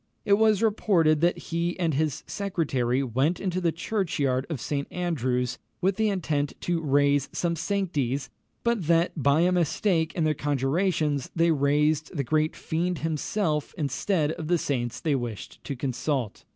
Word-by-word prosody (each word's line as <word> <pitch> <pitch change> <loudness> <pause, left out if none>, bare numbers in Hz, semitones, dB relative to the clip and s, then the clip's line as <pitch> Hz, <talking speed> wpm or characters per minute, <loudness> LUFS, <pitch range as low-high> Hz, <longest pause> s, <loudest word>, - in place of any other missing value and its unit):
It 200 - +4
was 215 0 +4
reported 175 -8 +3
that 175 +1 +3
he 170 +1 -2
and 165 -3 +1
his 150 0 -1
secretary 140 - -1
went 135 +7 0
into 185 -1 -2
the 170 -2 +2
churchyard 155 -8 -1
of 155 -6 -3
St. 140 +3 -2
Andrew's 130 -8 -1 0.2
with 190 +1 +1
the 220 -1 +2
intent 155 -7 -1
to 175 -1 -1
raise 145 -1 +2
"some 170 -1 0
sanctes;" 145 -8 -1 0.4
but 235 -8 0
that, 170 +1 +3
by 145 0 +3
a 180 +1 +3
mistake 170 -1 +1
in 170 - 0
their 155 -1 +2
conjurations, 145 +1 0
they 165 0 +3
raised 150 +1 +2
the 140 - +1
great 155 +4 +1
fiend 175 +2 -2
himself 155 0 -1
instead 150 - 0
of 160 -1 -5
the 175 +1 +3
saints 120 -6 -2
they 155 - 0
wished 120 -6 -5
to 140 - -3
consult. 130 -2 -2
155 Hz, 160 wpm, -26 LUFS, 140-175 Hz, 0.4 s, It